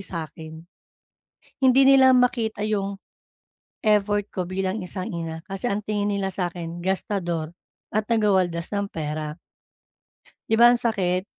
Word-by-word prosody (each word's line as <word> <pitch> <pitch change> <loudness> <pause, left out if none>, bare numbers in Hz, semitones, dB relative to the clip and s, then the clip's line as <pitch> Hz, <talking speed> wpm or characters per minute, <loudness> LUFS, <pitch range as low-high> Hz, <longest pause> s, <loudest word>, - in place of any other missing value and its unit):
sakin. 160 -3 -7 1.0
Hindi 260 +1 +5
nila 265 -1 +7
makita 230 -4 +1
yung, 200 -2 -1 0.9
effort 205 -1 +2
ko 185 - -1
bilang 190 +2 -2
isang 185 +1 -5
ina, 165 0 -5
kasi 195 +5 -3
ang 200 - 0
tingin 205 -1 -2
nila 200 -1 -1
sakin 175 -2 -4
gastador, 175 -4 -2 0.4
at 215 - +2
taga-waldas 190 -6 +1
ng 200 0 -2
pera. 155 0 -4 1.1
'Di 225 +1 +2
ba 240 - +9
ang 245 - +6
sakit? 190 -6 0
195 Hz, 125 wpm, -24 LUFS, 175-215 Hz, 1.1 s, ba